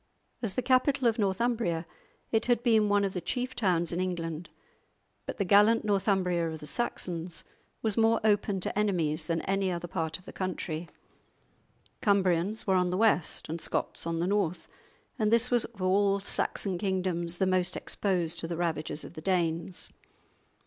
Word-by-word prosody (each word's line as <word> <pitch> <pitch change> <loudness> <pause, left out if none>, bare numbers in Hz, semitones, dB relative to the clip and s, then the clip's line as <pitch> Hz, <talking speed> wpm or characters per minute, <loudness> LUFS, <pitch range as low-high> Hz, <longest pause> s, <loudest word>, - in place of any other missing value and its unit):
As 215 -6 -1
the 255 - 0
capital 260 0 +3
of 230 0 +1
Northumbria 200 -4 0 0.5
it 225 0 +2
had 240 -1 +2
been 220 -4 +4
one 205 0 +3
of 195 -1 -1
the 180 - -3
chief 250 +9 -2
towns 175 -6 +1
in 175 +1 -1
England. 170 -2 -3 0.8
But - - -5
the 200 - 0
gallant 210 +4 +5
Northumbria 190 -4 +1
of 160 0 -6
the 150 - -9
Saxons 175 -4 -3 0.4
was 220 -3 0
more 225 0 +4
open 205 -2 +2
to - - -2
enemies 165 -7 +1
than 165 -1 0
any 195 0 0
other 175 0 -4
part 160 -2 -2
of 185 - -21
the - - -10
country; 175 -3 -4 1.1
Cumbrians 195 0 +2
were 190 - +2
on 180 -1 +2
the 180 - -1
west 215 -5 +2
and 165 +1 -4
Scots - - -3
on 165 0 -1
the 170 - +1
north, 190 -3 0 0.5
and 215 -1 +2
this 235 +2 +4
was 240 -2 +3
of 200 -5 -9
all 195 +1 +3
Saxon 195 -2 -2
kingdoms 180 -3 -1
the 190 - +2
most 185 -1 +1
exposed 175 -4 -1
to 165 - -3
the 170 -1 -4
ravages 160 -3 -2
of - - -10
the 155 - -8
Danes. 170 -1 -1
185 Hz, 175 wpm, -29 LUFS, 170-210 Hz, 1.1 s, gallant